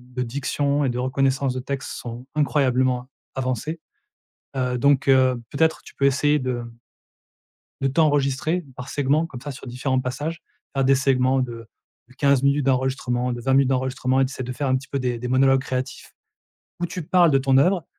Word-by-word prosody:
de 125 - -1
diction 140 +3 -1
et - - +1
de 120 - -3
reconnaissance 135 +1 0
de 130 - -3
texte 135 +1 -5
sont 120 +1 -7
incroyablement 130 -4 +1 0.3
avancés, 130 +5 -3 0.8
heu, 125 -1 0
donc 140 +1 +3
heu, 130 -2 +4
peut-être 160 +2 +1
tu - - -14
peux 140 - +2
essayer 145 +2 +3
de, 125 -3 -2
mmh 115 0 -12 1.0
de 135 - +2
t'enregistrer 145 +3 +1
par 125 +2 -8
segment 145 +3 +1
comme 135 -7 -9
ça 145 +3 -6
sur 135 - -10
différents 130 +1 -1
passages. 145 +6 -4 0.3
Faire 135 - +2
des 135 - +5
segments 130 0 +2
de 115 -3 -4 0.4
de 130 - -20
15 140 -2 +3
minutes 140 0 +2
d'enregistrement, 130 -2 0
de 120 - -5
20 130 +3 0
minutes 135 0 +4
d'enregistrement 130 0 0
et 135 - +4
tu 130 - -6
essaies 130 - -6
de 125 0 -4
faire 140 +3 -3
un 130 - +2
petit 130 +2 -4
peu 140 - -2
des 125 -1 -1
des 125 - -4
monologues 135 +1 +4
créatifs 130 -1 -5 0.7
où 175 - +1
tu 180 - -5
parles 170 +1 +4
de 135 - +4
ton 135 0 +3
œuvre. 175 +4 +3
135 Hz, 195 wpm, -23 LUFS, 125-140 Hz, 1.0 s, des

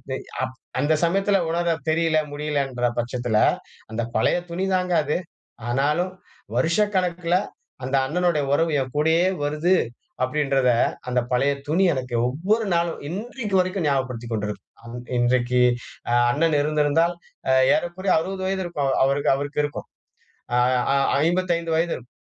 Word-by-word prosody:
அ - - -3 0.3
அப் 130 0 -4 0.2
அந்த 145 +3 +2
சமயத்தில 195 +3 +2
உணரத் 170 -1 -1
தெரியல, 160 0 +2
முடியலன்ற 140 -4 -1
பட்சத்தில, 120 -2 -1 0.5
அந்த 110 +1 -2
பழைய 110 - +2
துணி 185 +3 -2
தாங்க 180 -1 +1
அது. 150 +3 0 0.5
ஆனாலும், 150 +9 +1 0.4
"வருஷக்கணக்கில 180 - +1 0.5
அந்த 135 +1 -1
அண்ணனுடைய 170 -1 +1
உறவு 165 +1 +2
என் 130 0 -6
கூடயே 160 +3 +3 0.2
வருது" 155 +5 +2 0.5
அப்படின்றத 135 -1 +1 0.4
அந்த 125 0 +1
பழைய 135 +3 +2 0.2
துணி 185 +5 +3
எனக்கு 125 -2 -4
ஒவ்வொரு 200 - 0
நாளும், 170 0 0
இன்றைக்கு 210 +2 -4
வரைக்கும் 185 -3 -1
ஞாபகப்படுத்திக் 125 -4 -2
கொண்டிருக்கும். 105 -1 -4 0.2
அ - - -16 0.3
இன்றைக்கு 125 0 +2 0.5
அ - - +2 0.2
அண்ணன் 150 +1 +2
இருந்திருந்தால் 155 +3 +2 0.6
ஏறக்குறைய 180 +4 -1
60 190 +3 -4
வயது 190 0 -1
இருக்கும். 145 -6 -1
அவருக்கு. 140 +1 +2
அவருக்கு 145 +1 -2
இருக்கும். 145 - -7 0.7
அ - - +3 0.4
அ - - +3 0.3
55 170 -2 0
வயது 170 +1 +1
இருக்கும். 125 0 -12
155 Hz, 130 wpm, -23 LUFS, 135-175 Hz, 0.7 s, கூடயே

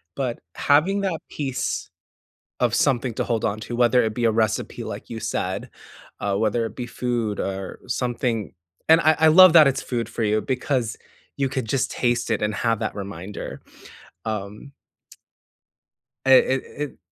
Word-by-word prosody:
but 125 -4 -2 0.2
having 165 +8 +3
that 185 -5 -1
piece 135 -4 -3 0.7
of 120 -1 +2
something 125 -3 +1
to - - -1
hold 115 -3 -1
on 105 0 0
to, 120 +2 -5
whether 125 +1 +4
it 110 -1 -1
be 120 0 -2
a 115 - +5
recipe, 110 -1 -1
like - - -7
you 115 - -5
said, - - -3 0.5
uh, 100 -1 -1
whether 110 +2 +1
it 110 - -8
be 125 -2 -4
food 120 -4 -2
or 95 0 -4
something 120 -3 -2 0.4
and 160 +1 +7
I 155 0 +4
I 160 - +5
love 180 +2 +8
that 155 -3 +9
it's 135 -1 +1
food 120 -3 -3
for 115 0 -4
you, 110 0 +2
because 130 -2 -1 0.4
you 135 -1 0
could 130 -3 -2
just 135 +2 0
taste 120 -1 0
it - - +1
and 105 -1 0
have 115 +1 0
that - - -2
reminder. 100 -1 -7 0.7
Um 105 +5 -5 1.5
It 130 -1 +7
it 130 0 0
it 145 -1 -5
120 Hz, 170 wpm, -23 LUFS, 110-135 Hz, 1.5 s, that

